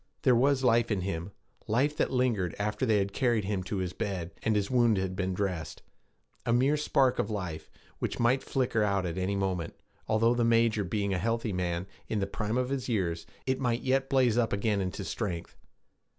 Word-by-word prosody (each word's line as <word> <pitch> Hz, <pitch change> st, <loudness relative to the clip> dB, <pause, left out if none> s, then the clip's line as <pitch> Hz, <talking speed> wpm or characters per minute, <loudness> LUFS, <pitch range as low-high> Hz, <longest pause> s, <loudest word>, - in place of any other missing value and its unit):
There 130 Hz, -, +5 dB
was 135 Hz, +2 st, +3 dB
life 120 Hz, -1 st, +4 dB
in 100 Hz, -4 st, 0 dB
him 90 Hz, 0 st, -3 dB, 0.4 s
life 135 Hz, +7 st, +2 dB
that -, -, +1 dB
lingered 120 Hz, -9 st, 0 dB
after 105 Hz, +5 st, -1 dB
they 110 Hz, -2 st, +4 dB
had 100 Hz, 0 st, -1 dB
carried 120 Hz, -6 st, +1 dB
him 100 Hz, -1 st, -1 dB
to 100 Hz, -, -3 dB
his 90 Hz, -1 st, -2 dB
bed 95 Hz, -5 st, -3 dB
and 110 Hz, -, +1 dB
his 100 Hz, +1 st, 0 dB
wound 120 Hz, -4 st, +4 dB
had 95 Hz, -1 st, -2 dB
been 95 Hz, -1 st, -1 dB
dressed; 90 Hz, -5 st, -3 dB, 0.6 s
a -, -, 0 dB
mere 130 Hz, +5 st, +3 dB
spark 135 Hz, -3 st, +2 dB
of 105 Hz, -, 0 dB
life, 85 Hz, -7 st, -4 dB, 0.3 s
which -, -, -3 dB
might 120 Hz, +3 st, +3 dB
flicker 125 Hz, -4 st, 0 dB
out 100 Hz, -3 st, +1 dB
at 85 Hz, +1 st, -3 dB
any 95 Hz, +2 st, 0 dB
moment, 95 Hz, -4 st, -2 dB, 0.3 s
although, 115 Hz, +2 st, +3 dB
the 120 Hz, -1 st, +1 dB
major 115 Hz, -2 st, +3 dB
being 100 Hz, +1 st, -1 dB
a 90 Hz, -, 0 dB
healthy 115 Hz, 0 st, -1 dB
man, 90 Hz, -1 st, -1 dB, 0.2 s
in 110 Hz, -, -1 dB
the 100 Hz, -, +1 dB
prime 105 Hz, +3 st, -2 dB
of 125 Hz, +1 st, 0 dB, 0.2 s
years, 85 Hz, -7 st, -1 dB, 0.2 s
it 130 Hz, 0 st, 0 dB
might 120 Hz, -2 st, 0 dB
yet 135 Hz, +1 st, +1 dB
blaze 125 Hz, -4 st, +3 dB
up 115 Hz, -, +1 dB
again 100 Hz, 0 st, +1 dB
into 95 Hz, +2 st, -3 dB
strength. 95 Hz, -4 st, -4 dB
105 Hz, 200 wpm, -29 LUFS, 95-120 Hz, 0.6 s, There